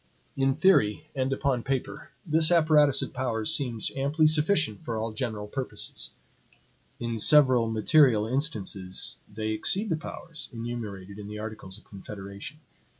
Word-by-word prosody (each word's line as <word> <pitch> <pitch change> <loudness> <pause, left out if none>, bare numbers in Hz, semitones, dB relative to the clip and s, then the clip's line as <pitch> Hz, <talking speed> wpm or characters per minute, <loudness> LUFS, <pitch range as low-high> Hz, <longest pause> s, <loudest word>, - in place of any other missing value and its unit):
In 135 0 +1
theory, 150 - +2
and 130 0 -1
upon 135 -2 0
paper, 135 +1 -4 0.2
this 160 0 +3
apparatus 155 -4 +4
of - - -7
powers 120 0 +1
seems 125 -8 +1
amply 145 +4 +1
sufficient 155 - +2
for 115 -2 -4
all 110 0 -3
general 110 -3 -4
purposes. 130 +4 -3 0.9
In 115 -1 -3
several 130 -3 +5
material 110 0 +3
instances, 105 - -1
they 110 +1 -4
exceed 190 - +1
the 165 - +1
powers 165 0 -8
enumerated 110 -5 -7
in 100 - -8
the 105 0 -7
articles 105 -3 -8
of 105 - -19
confederation. 100 +7 -9
120 Hz, 140 wpm, -27 LUFS, 110-150 Hz, 0.9 s, several